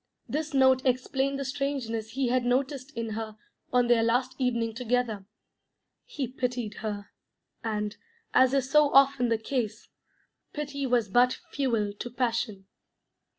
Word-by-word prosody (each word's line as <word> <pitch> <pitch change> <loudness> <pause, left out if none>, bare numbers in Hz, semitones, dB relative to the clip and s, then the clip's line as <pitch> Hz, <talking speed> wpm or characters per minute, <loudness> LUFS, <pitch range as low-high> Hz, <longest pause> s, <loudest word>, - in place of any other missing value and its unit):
This 310 +1 -2
note 260 -1 +5
explained 265 +2 0
the 275 - -3
strangeness 260 -5 -3
he 265 -1 0
had 250 0 +2
noticed 260 +2 0
in 230 -1 -2
her 215 0 -5 0.3
on 250 -1 +4
their 240 -1 +4
last 245 +3 +1
evening 235 -3 0
together. 235 -4 -1 0.8
He 275 -4 -4
pitied 245 -4 -3
her, 205 -2 -5 0.5
and, 210 -1 -2 0.4
as 260 +1 +5
is 265 -2 +1
so 300 +1 +4
often 275 -3 +5
the 230 - +2
case, 225 -2 -3 0.6
pity 285 -2 -3
was 240 -3 +2
but 245 +5 +3
fuel 230 -7 0
to 245 - -4
passion. 230 -5 -2
250 Hz, 140 wpm, -28 LUFS, 225-265 Hz, 0.8 s, note